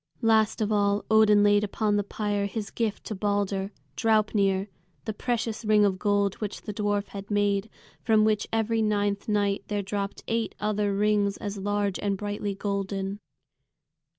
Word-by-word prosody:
Last 220 -1 +3
of 215 0 0
all 205 -1 +1
Odin 215 -1 +6
laid 205 0 +4
upon 210 0 0
the 205 - +1
pyre 205 0 -2
his 205 0 -5
gift 225 -3 -2
to - - -5
Balder, 200 -1 -1 0.2
Draupnir, 205 -1 +2 0.4
the 220 - -2
precious 225 0 -2
ring 210 -1 +4
of 190 -2 0
gold 205 -2 +2
which 210 -1 -4
the 210 - -5
dwarf 205 -1 -1
had 200 0 -8
made, 205 0 +1 0.3
from 220 -2 +3
which 215 -1 +1
every 225 0 +1
ninth 205 -1 0
night 205 -1 +1
there 205 -1 -2
dropped 200 0 -4
eight 230 -1 -1
other 210 -1 0
rings 205 -1 +2
as 205 -1 -5
large 205 0 -1
and 200 -1 -1
brightly 205 0 -3
golden. 195 0 -3
205 Hz, 160 wpm, -27 LUFS, 200-215 Hz, 0.4 s, Odin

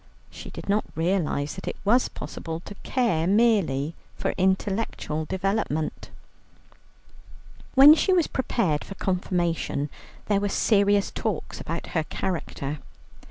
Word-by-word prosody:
She - - -9
did - - -9
not 205 +2 +2
realize 165 -4 0
that 190 - -9
it - - -2
was 240 +5 +4
possible 165 -1 -6
to 205 - -9
care 225 -11 +1
merely 190 - +2 0.2
for - - -2
intellectual 190 -4 0
development. 190 -4 -2 1.7
When 275 +3 +10
she 355 +4 +2
was 355 -4 +4
prepared 190 - 0
for 195 - -9
Confirmation, 175 -6 -1 0.3
there 205 -2 +2
were 205 0 -1
serious 200 -1 +3
talks 215 -7 -3
about 165 +1 -4
her 160 - +1
character. 155 -6 -3
190 Hz, 120 wpm, -25 LUFS, 160-210 Hz, 1.7 s, When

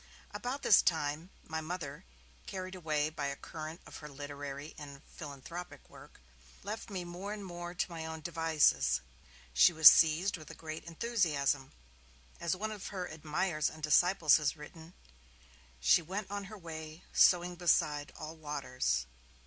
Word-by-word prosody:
About 245 +7 -4
this - - +7
time, 160 0 0
my 160 -1 -4
Mother, 160 - -6 0.4
carried 185 -1 -5
away 155 -4 -1
by 145 -3 -2
the 140 - -4
current 155 +3 -8
of - - -10
her 150 - -9
literary 145 +1 -7
and 145 -2 -9
her 140 - -16
philanthropic 160 +4 -9
work, - - -15 0.4
left 215 +3 -5
me 190 -3 -4
more 180 +4 -6
and 205 -2 -7
more 175 -1 -7
to 175 - -1
my 165 -1 -5
own 160 0 -6
devices. 155 - +2 0.5
She 65 - +7
was 160 -2 +8
seized 165 +4 +3
with 155 -2 -12
a - - -9
great 155 0 -7
enthusiasm; 160 - 0 0.7
as 170 +1 0
one 215 +3 -3
of 210 -3 -6
her 185 -3 -4
admirers 155 0 -1
and 155 0 -13
disciples 160 +1 +5
has 150 0 -1
written, 160 +3 -12 0.8
'she 70 +3 +5
went 195 +5 -5
on 205 -1 -3
her 215 +2 -9
way, 160 -2 -8
sowing 180 0 +5
beside 150 -4 +2
all 155 +1 -7
waters'. 130 - -1
160 Hz, 155 wpm, -33 LUFS, 150-180 Hz, 0.8 s, was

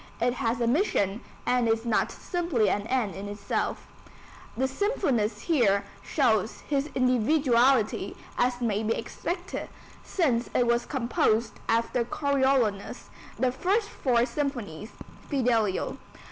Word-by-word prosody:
It 245 - +2
has 235 -1 -1
a 235 - +1
mission 230 - +1 0.2
and 245 -1 +2
is 225 +1 +1
not 230 -2 +1
simply 330 - 0
an 205 +2 -2
end 245 -6 0
in 200 +1 -6
itself. 205 0 -3 0.7
The 265 +2 +2
Symphonist 265 - 0
here 215 - +2 0.2
shows 220 -1 +1
his 285 0 -1
individuality 255 -1 +2 0.2
as 245 0 +1
may 215 -3 0
be 225 +1 0
expected, 350 +9 -4 0.3
since 250 -10 0
it 245 - +4
was 235 0 +1
composed 235 -4 0
after 230 +2 +2
Coriolanus, 265 -6 0 0.3
the 255 -1 +2
first 400 - 0
four 240 -3 +1
symphonies, 240 - -4 0.4
Fidelio. 230 -8 +1
240 Hz, 120 wpm, -27 LUFS, 220-275 Hz, 0.7 s, it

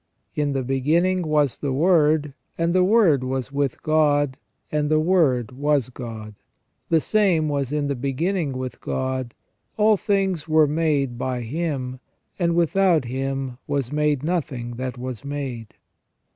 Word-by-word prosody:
" - - -49
In 145 -1 -1
the 135 -1 -1
beginning 160 +9 +1
was 150 -5 +1
the 140 - -2
Word, 150 -1 +3 0.2
and 170 0 +1
the 185 0 +4
Word 185 - +4
was 130 0 -3
with 140 -2 -2
God, 145 -3 +2 0.3
and 150 -1 0
the 155 0 +3
Word 155 - +2
was 140 -1 0
God. 115 -4 -8 0.6
The 165 - +4
same 180 -4 +2
was 140 -3 -1
in 150 -1 0
the 140 - 0
beginning 140 +5 -1
with 130 0 -6
God. 130 -2 -3 0.4
All 215 0 +4
things 195 -6 0
were 155 -1 +5
made 145 -5 0
by 125 -1 -2
Him; 130 -1 -3 0.4
and 170 -2 +1
without 170 -2 +3
Him 135 0 -3
was 140 -3 -2
made 150 -2 +1
nothing 145 -8 -2
that 130 -1 -4
was 125 -1 -6
made." 135 -6 -5
145 Hz, 150 wpm, -23 LUFS, 130-165 Hz, 0.6 s, were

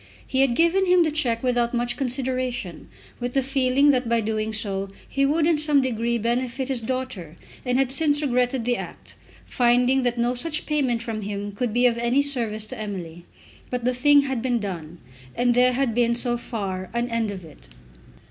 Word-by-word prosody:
He 265 - 0
had 265 -3 +2
given 350 +5 +3
him 360 -1 +5
the 315 - 0
cheque 245 -7 0
without 245 -1 +1
much 240 0 0
consideration, 255 - -3 0.3
with 245 +1 -4
the 270 - +2
feeling 270 +1 +3
that 250 -3 0
by 235 0 +3
doing 215 0 -2
so 195 -3 -3 0.2
he 275 0 +1
would 305 +2 +2
in 325 -2 +2
some 300 -2 +4
degree 235 -2 0
benefit 245 +3 -2
his 260 -3 -2
daughter; 225 -9 -4 0.3
and 250 -1 0
had 265 -1 +1
since 290 +1 +2
regretted 250 -3 0
the 245 0 +1
act, - - -9 0.3
finding 250 +2 +2
that 245 -1 -1
no 240 +1 +1
such 310 +5 0
payment 260 -6 0
from 225 -2 -4
him 205 0 -4
could 225 +3 -2
be 245 +3 +2
of 235 -1 +2
any 240 +4 +2
service 230 -6 -1
to 250 +1 -8
Emily. 175 -5 -6 0.4
But 250 -1 -3
the 250 - +2
thing 285 +3 +5
had 265 -4 -3
been 250 -1 0
done, 175 -6 -6 0.4
and 245 0 +2
there 250 +1 +4
had 255 -2 0
been, 235 0 +2
so 240 0 0
far, 195 -6 -5
an 235 0 0
end 230 -2 0
of 190 -4 -7
it. - - -16
245 Hz, 195 wpm, -24 LUFS, 225-265 Hz, 0.4 s, him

